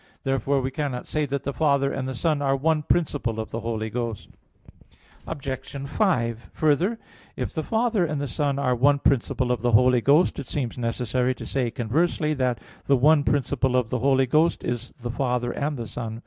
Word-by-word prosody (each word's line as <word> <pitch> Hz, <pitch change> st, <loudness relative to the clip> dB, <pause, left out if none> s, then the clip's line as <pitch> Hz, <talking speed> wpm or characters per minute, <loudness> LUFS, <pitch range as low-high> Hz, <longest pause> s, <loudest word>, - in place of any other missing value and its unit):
Therefore 135 Hz, 0 st, +1 dB
we 130 Hz, +1 st, -2 dB
cannot 140 Hz, -4 st, -3 dB
say 150 Hz, -1 st, -1 dB
that 140 Hz, 0 st, -3 dB
the 140 Hz, -, -3 dB
Father 140 Hz, -3 st, +2 dB
and 130 Hz, -, -3 dB
the 130 Hz, -, -4 dB
Son 150 Hz, +2 st, 0 dB
are 135 Hz, -1 st, +2 dB
one 155 Hz, +3 st, +1 dB
principle 145 Hz, -8 st, 0 dB
of 110 Hz, -, -5 dB
the 115 Hz, -, -3 dB
Holy 110 Hz, -1 st, -3 dB
Ghost. 115 Hz, -3 st, -4 dB, 1.0 s
Obj. 145 Hz, -4 st, -6 dB, 0.4 s
5: 120 Hz, -, 0 dB
Further, 160 Hz, +9 st, +2 dB, 0.4 s
if -, -, -4 dB
the 160 Hz, -, -1 dB
Father 225 Hz, +1 st, +1 dB
and 155 Hz, -3 st, -1 dB
the 145 Hz, -, -2 dB
Son 140 Hz, +2 st, -1 dB
are 135 Hz, -3 st, +1 dB
one 140 Hz, +4 st, +4 dB
principle 130 Hz, -2 st, +1 dB
of 120 Hz, -3 st, -1 dB
the 120 Hz, -1 st, +1 dB
Holy 125 Hz, +2 st, +5 dB
Ghost, 145 Hz, +7 st, +3 dB
it 140 Hz, -, -6 dB
seems 130 Hz, -6 st, -3 dB
necessary 125 Hz, +1 st, -1 dB
to -, -, -8 dB
say, 130 Hz, -3 st, -1 dB
conversely, 150 Hz, +7 st, 0 dB
that 125 Hz, -5 st, 0 dB, 0.3 s
the 140 Hz, -, +4 dB
one 145 Hz, +3 st, +5 dB
principle 135 Hz, -2 st, +1 dB
of 125 Hz, -3 st, +1 dB
the 125 Hz, -, 0 dB
Holy 135 Hz, +1 st, +3 dB
Ghost 155 Hz, +6 st, +2 dB
is 120 Hz, 0 st, -3 dB
the 120 Hz, 0 st, -4 dB
Father 125 Hz, -1 st, -1 dB
and 145 Hz, 0 st, -2 dB
the 115 Hz, -2 st, -5 dB
Son. 115 Hz, +1 st, -5 dB
135 Hz, 195 wpm, -25 LUFS, 120-145 Hz, 1.0 s, Holy